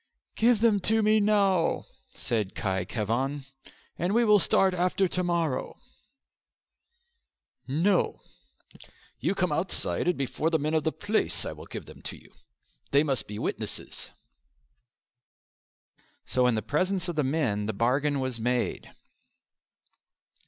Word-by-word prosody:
"Give 230 -1 +3
them 225 -3 +4
to 220 +3 +2
me 215 +1 +4
now," 200 -4 +2 0.3
said 105 -5 -2
Khy 95 -2 -1
Khevan, 130 +7 -2 0.5
"and 180 +5 0
we 235 0 +4
will 210 -1 +6
start 190 +1 +3
after 180 +2 +1
to 180 +1 -2
morrow." 170 -6 -1 1.9
"No," 170 +8 +3
replied - - -15
Forder, - - -17 0.3
"you 170 +10 0
come 180 -4 0
outside, 170 +4 -1
and 180 - +2
before 140 +4 -1
the 165 - +2
men 155 +1 -2
of 160 -1 +1
the 160 - +2
place 210 +6 0
I - - -3
will - - -11
give - - -7
them - - -13
to - - -4
you; - - -19 0.6
they 140 +1 +4
must 135 -4 -1
be 105 - -6
witnesses." - - -3 2.2
So 125 -1 +2
in 125 - +2
the 110 - -2
presence 185 +4 0
of 175 - -3
the 150 - +1
men 130 -8 0
the - - 0
bargain 135 +7 +1
was 130 -3 -2
made. 125 +2 -1
160 Hz, 145 wpm, -27 LUFS, 130-190 Hz, 2.2 s, will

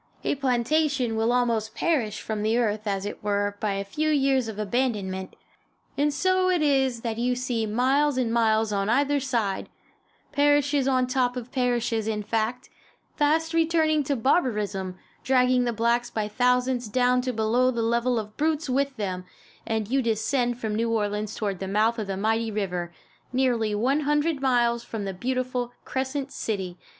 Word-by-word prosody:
A - - +1
plantation 265 -1 +1
will 225 +1 +1
almost 230 -3 0
perish 245 -11 0
from 215 -1 -3
the 220 +2 +1
earth, 215 -2 0
as 195 -1 -1
it 205 - -6
were, 205 0 0
by 210 -2 -1
a 195 0 -2
few 305 +10 -1
years 270 -4 +2
of 220 -2 -6
abandonment. 205 -4 -2 0.6
And 295 +1 +2
so 370 +4 +2
it 355 -4 +2
is 265 -5 +2
that 230 -1 -3
you 250 +1 +1
see 245 -3 -2
miles 265 +6 +2
and 235 -3 0
miles 220 -2 +2
on 200 +1 0
either 285 +4 +2
side 235 -7 -2 0.6
parishes 290 -1 +3
on 255 -1 +3
top 250 -1 0
of 245 0 -7
parishes, 240 -3 0
in 210 -1 -2
fact 225 +3 -2 0.5
fast 320 +2 +1
returning 320 -2 +2
to 280 - 0
barbarism, 210 - 0 0.3
dragging 250 -1 +3
the 240 - +1
blacks 235 +2 +1
by 215 -3 -2
thousands 250 +2 +1
down 250 +3 +2
to 255 0 -2
below 235 +3 +2
the 235 -2 -1
level 235 +2 +1
of 215 -1 -5
brutes 310 0 0
with 275 +1 0
them, 185 -3 -3 0.4
as 220 0 -2
you 270 0 +3
descend 240 +2 0
from 220 -3 -3
New 230 +2 0
Orleans 210 -1 -1
toward 200 -4 -3
the 190 - -4
mouth 220 +4 +1
of 210 - -3
the 195 -1 -3
mighty 225 +3 0
river, 180 -5 -3 0.4
nearly 240 -5 +1
one 260 +7 +1
hundred 295 0 0
miles 240 -3 +2
from 225 -3 -5
the 195 - -3
beautiful 250 +3 -2
"Crescent 265 +1 -3
City." 190 -5 -4
240 Hz, 170 wpm, -25 LUFS, 215-265 Hz, 0.6 s, parishes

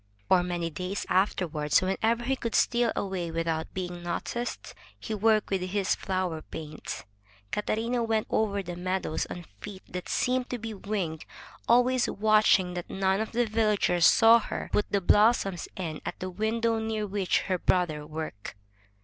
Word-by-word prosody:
For 185 -1 +5
many 175 -2 -2
days 180 +6 -4
afterward, 175 -6 0
whenever 220 +5 +2
he 270 +3 +1
could 230 -3 -3
steal 240 -1 +3
away 185 -3 -2
without 165 -1 -2
being 180 -2 -5
noticed, 235 +7 -4 0.3
he 220 - -5
worked 215 0 +2
with 190 -1 +1
his 190 +1 0
flower 185 -4 -2
paints. 155 -1 -7 0.5
Cata 210 - -1
rina 235 +2 -1
went 220 -1 0
over 200 -2 0
the 175 -1 -6
meadows 185 -2 -2
on 175 -1 -7
feet 190 - -9
that 180 0 -6
seemed 255 0 0
to 250 - -2
be 225 -1 -6
winged, 190 -6 -3 0.4
always 250 +1 +4
watching 210 -3 +3
that 175 -1 -5
none 190 +1 +1
of 220 - -4
the 240 +1 +1
villagers 210 -6 +3
saw 230 +1 +7
her 215 - -5
put 210 - +1
the 200 - +2
blossoms 200 -2 +3
in 160 -5 -5
at - - -5
the 185 0 -4
window 225 +3 0
near 220 -1 -2
which 195 -2 0
her 185 -2 -1
brother 170 -6 +1
worked. 150 -11 -6
195 Hz, 165 wpm, -28 LUFS, 175-220 Hz, 0.5 s, saw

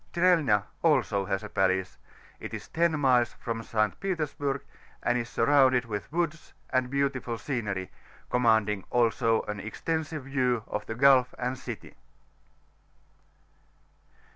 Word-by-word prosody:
Strelna 165 - +3 0.2
also 125 -11 +2
has 95 +1 -2
a 105 - -7
palace; 95 -1 0 0.4
it - - -6
is - - -8
10 165 -2 +1
miles 125 -4 +3
from 115 -1 -4
St. 110 -1 -1
Petersburg, 150 -7 -2 0.4
and 120 - +2
IS 120 -1 -2
surrounded 130 +1 +4
with 105 +1 -5
woods 165 -1 -2 0.2
and 130 -1 +1
beautiful 135 -3 -1
scenery, 105 -7 -3 0.4
commanding 110 -5 +2
also 115 -1 +2
an 105 -1 -5
extensive 155 - -3
view 125 -4 0
of 105 - -5
the 110 - -4
gulf 130 0 +5
and 125 +1 -2
city 130 - -8
125 Hz, 125 wpm, -28 LUFS, 110-140 Hz, 0.4 s, gulf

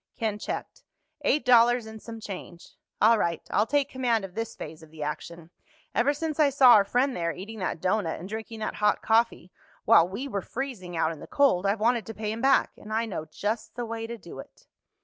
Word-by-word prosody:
Ken 215 -2 -2
checked. - - -5 0.4
"Eight 300 - +2
dollars 240 -1 +5
and 220 -1 -10
some 230 -1 -8
change." 185 -4 -9 0.2
"All 225 +1 +5
right. 170 -3 -1
I'll 210 +2 +2
take 285 -2 +2
command 240 -5 0
of 185 - -11
this 225 +2 -4
phase 155 +1 -8
of 160 - -14
the 155 -1 -7
action. 165 +3 -6 0.4
Ever 240 +6 +3
since 310 +1 -4
I 300 -2 +5
saw 265 -3 +7
our 205 - +7
friend 250 +6 +1
there 170 -1 -1
eating 210 +6 -8
that 185 -3 -2
doughnut 185 -1 0
and 180 - -8
drinking 220 +1 -6
that - - -3
hot 210 0 +2
coffee—while 220 -6 +2
we 245 +9 -5
were 200 -7 -3
freezing 210 -9 -5
out 160 0 +1
in 160 - -8
the - - -10
cold—I've 205 -7 +2
wanted 230 -1 +1
to 225 - -7
pay 215 -1 -3
him 225 +1 -5
back. 270 +1 +4
And 215 - -11
I 225 +1 +1
know 185 -8 -5
just 210 +8 -4
the 245 -1 -3
way 225 0 -5
to 235 0 -6
do 170 -9 -11
it." - - -13
220 Hz, 215 wpm, -27 LUFS, 185-240 Hz, 0.4 s, saw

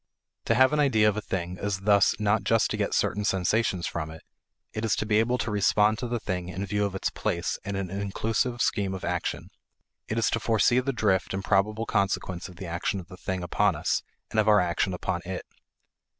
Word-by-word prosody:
To 115 - +2
have 130 +4 +5
an 150 - +2
idea 115 -7 +4
of 105 - +2
a 110 - -2
thing 90 -2 -4
is 100 -1 -2
thus 100 0 +4
not 105 +1 +2
just 115 -1 +2
to - - 0
get - - 0
certain 105 +2 0
sensations 95 -1 +1
from 75 -1 -3
it. 80 0 -11 0.5
It 110 - -4
is 110 - +2
to - - -2
be 105 0 +3
able 120 +3 +2
to 110 -2 -2
respond 105 +1 +3
to 125 - -3
the 120 0 -2
thing 90 -4 -3
in 95 +2 -4
view 105 +2 0
of 100 -1 -3
its 95 - -1
place 85 +2 -2
in 100 0 -4
an 95 -2 -3
inclusive 110 +5 -1
scheme 95 -2 0
of 95 - -6
action; - - -3 0.6
it 110 - -2
is 115 - +2
to 115 - 0
foresee 115 +2 +3
the 130 +2 -1
drift 100 -6 +1
and 95 - -3
probable 105 +3 +1
consequence 95 -4 -1
of 90 - -13
the 95 - -8
action 85 +3 -2
of 85 - -11
the 90 - -11
thing 95 -1 -3
upon 100 +2 +2
us 75 - 0 0.3
and 110 - +1
of 110 - +2
our 105 -1 +6
action 90 +1 0
upon 90 0 -2
it. 90 0 -5
100 Hz, 225 wpm, -27 LUFS, 95-110 Hz, 0.6 s, our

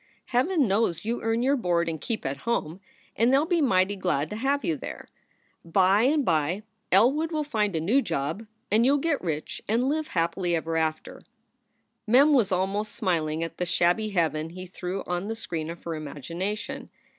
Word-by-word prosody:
Heaven 275 +3 +2
knows 195 -3 +1
you 235 +2 -2
earn 225 +1 0
your 275 +2 +3
board 175 -8 +1
and 160 -2 -3
keep 225 -2 -3
at 135 +1 -2
home, 180 -3 -2 0.4
and 235 +3 +3
they 270 - +5
ll 290 - +2
be 340 -1 +1
mighty 200 -7 +3
glad 155 -6 -1
to - - -3
have 275 +5 0
you 160 - +1
there. - - -8 0.6
By 190 +4 +3
and 290 0 +2
by 165 +5 +1 0.3
Elwood 275 - +4
will 310 -2 0
find 210 - -1
a - - +1
new 215 - +3
job, 165 - -3 0.2
and 220 +3 +4
you 270 +3 +4
ll - - +2
get 290 0 0
rich 155 -4 -4
and 235 +5 +1
live 310 +1 -1
happily 170 +1 +1
ever 165 0 -2
after 160 -1 -2 0.4
" - - -48
Mem 275 +7 +6
was 225 -8 +3
almost 195 +3 -1
smiling 165 -6 0
at 165 - -6
the 180 - 0
shabby 175 +5 +2
heaven 160 -4 0
he 185 +2 -8
threw 185 +1 -5
on 180 +2 -2
the 225 - -3
screen 165 -7 -4
of 170 0 -8
her 170 - -4
imagination. 165 - -5
195 Hz, 195 wpm, -26 LUFS, 165-240 Hz, 0.6 s, Mem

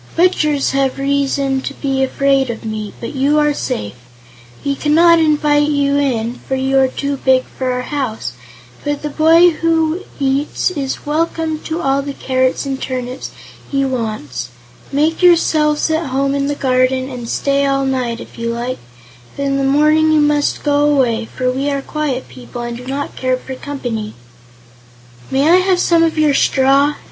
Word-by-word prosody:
Butchers 305 -5 +2
have 270 -1 0
reason 275 -1 0
to 275 - -5
be 270 -2 -1
afraid 270 0 +1
of 230 -1 -6
me, 215 -1 -4
but 235 - -6
you 280 +2 +2
are 295 -1 +3
safe. 105 - -3 0.7
We 280 - +1
cannot 330 +4 +4
invite 295 -1 +2
you 285 -1 +1
in, 240 -4 -1
for 265 - 0
you 265 +1 +1
are 265 - +4
too 280 +2 -3
big 260 -1 +3
for 260 -1 -4
our 250 0 -2
house, 245 - -3 0.5
but 290 0 -3
the 300 - -3
boy 330 +3 +5
who 325 +1 0 0.2
eats 275 +5 0
is 275 -6 -4
welcome 315 +1 -1
to 325 +2 -3
all 275 -1 +1
the 280 0 -6
carrots 260 0 0
and 270 -1 -4
turnips 255 0 -4 0.4
he 275 -1 0
wants. 215 - -4 0.4
Make 305 +5 +1
yourselves 315 -3 +3
at 315 0 0
home 275 +1 0
in 280 0 0
the 290 - -1
garden 255 -1 +1
and 245 -3 -7
stay 280 0 +1
all 275 0 +1
night, 255 -3 -1
if - - -11
you 230 0 -2
like; 240 +2 -4 0.6
but 280 - -2
in 275 0 0
the 275 - 0
morning 305 +3 +3
you 310 - +4
must 295 -1 +1
go 290 0 +2
away, 235 -5 +1
for 255 +2 -2
we 270 +3 -1
are 280 -1 -2
quiet 290 -4 -3
people 125 - -9
and 240 0 -4
do 250 +1 -10
not 280 +2 -4
care 255 0 0
for 265 - -8
company." 245 -6 -5 1.1
"May 275 +3 +2
I 345 +2 +6
have 370 -1 +2
some 340 -2 +3
of 330 -1 +1
your 305 -2 +3
straw?" 275 +2 +3
275 Hz, 175 wpm, -17 LUFS, 255-300 Hz, 1.1 s, I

